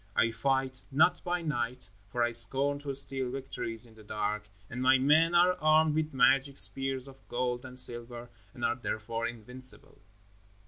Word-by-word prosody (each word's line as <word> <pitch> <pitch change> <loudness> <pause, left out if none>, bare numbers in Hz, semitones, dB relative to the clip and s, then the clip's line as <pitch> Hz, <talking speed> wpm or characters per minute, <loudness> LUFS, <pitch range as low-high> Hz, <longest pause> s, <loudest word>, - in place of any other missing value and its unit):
I 115 - +2
fight 130 +2 -2
not 160 +6 +2
by 175 -1 -2
night, 125 -6 -4 0.2
for 120 +3 -2
I 120 - 0
scorn 135 +5 +6
to 140 -1 -5
steal 135 -2 -4
victories 125 -3 -5
in 115 - -14
the 110 -1 -16
dark, 105 0 -4 0.2
and 125 +1 -7
my 130 +1 +4
men 155 +6 +3
are 180 +1 +5
armed 155 0 +3
with 155 0 -1
magic 135 0 +2
spears 135 -1 0
of 135 0 -16
gold 125 0 -3
and 125 0 -10
silver 120 -1 0 0.2
and 120 - -5
are - - 0
therefore 115 -1 -4
invincible." 125 +3 -9
130 Hz, 170 wpm, -29 LUFS, 120-140 Hz, 0.2 s, scorn